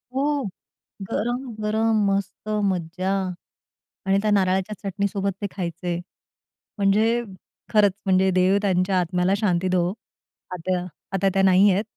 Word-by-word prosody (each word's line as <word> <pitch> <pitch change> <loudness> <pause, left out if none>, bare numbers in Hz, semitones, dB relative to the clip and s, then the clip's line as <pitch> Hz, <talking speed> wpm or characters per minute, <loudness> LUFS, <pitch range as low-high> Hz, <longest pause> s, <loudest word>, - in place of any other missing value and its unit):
हो, 285 +1 +1 0.7
गरम, 240 +4 -1 0.2
गरम 220 0 +2
मस्त 195 +2 -3 0.2
मज्जा. 185 +1 -3 0.9
आणि 195 0 +3
त्या 215 0 +1
नारळाच्या 190 +1 +1
चटणीसोबत 200 0 -1
ते 205 - -1
खायचे. 175 -1 -3 0.8
म्हणजे 215 +4 +3 0.5
खरंच 210 -2 +5
म्हणजे 190 0 +3
देव 185 +2 +3
त्यांच्या 185 -1 +2
आत्म्याला 180 +2 +1
शांती 185 -4 +1
देवो, 180 0 +1 0.6
आता 180 0 -2 0.3
आता 195 +1 +2
त्या 195 - +3
नाहीयेत. 190 +1 +5
195 Hz, 115 wpm, -24 LUFS, 185-210 Hz, 0.9 s, खरंच